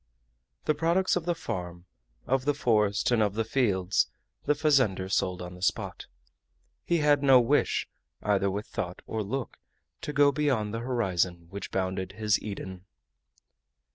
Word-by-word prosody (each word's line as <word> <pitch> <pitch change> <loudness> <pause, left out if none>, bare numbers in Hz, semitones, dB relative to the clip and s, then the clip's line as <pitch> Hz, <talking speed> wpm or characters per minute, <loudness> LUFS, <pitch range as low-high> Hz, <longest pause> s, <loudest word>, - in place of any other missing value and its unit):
The 155 - +3
products 170 +5 +2
of 175 -2 -2
the 175 -1 0
farm, 90 - -5 0.4
of 130 0 0
the 145 0 +2
forest, 105 -5 +2
and 120 -2 +3
of 105 -1 +1
the 115 - +1
fields, 100 -8 +1 0.4
the 150 - +3
fazender 130 - +2
sold 90 -2 0
on 90 0 -8
the 90 - -12
spot. 95 - -2 0.8
He 170 - +1
had 150 -2 +3
no 135 -2 +7
wish, 120 - +1 0.4
either 100 -1 +2
with 100 +2 -3
thought 90 -2 -5
or 110 - -3
look, 120 +5 -4 0.4
to - - -4
go 145 0 +5
beyond 130 -8 0
the 115 - -2
horizon 95 -8 -1
which 100 +1 -6
bounded 95 0 -2
his 105 -1 +1
Eden. 95 -3 -7
110 Hz, 155 wpm, -28 LUFS, 95-140 Hz, 0.8 s, no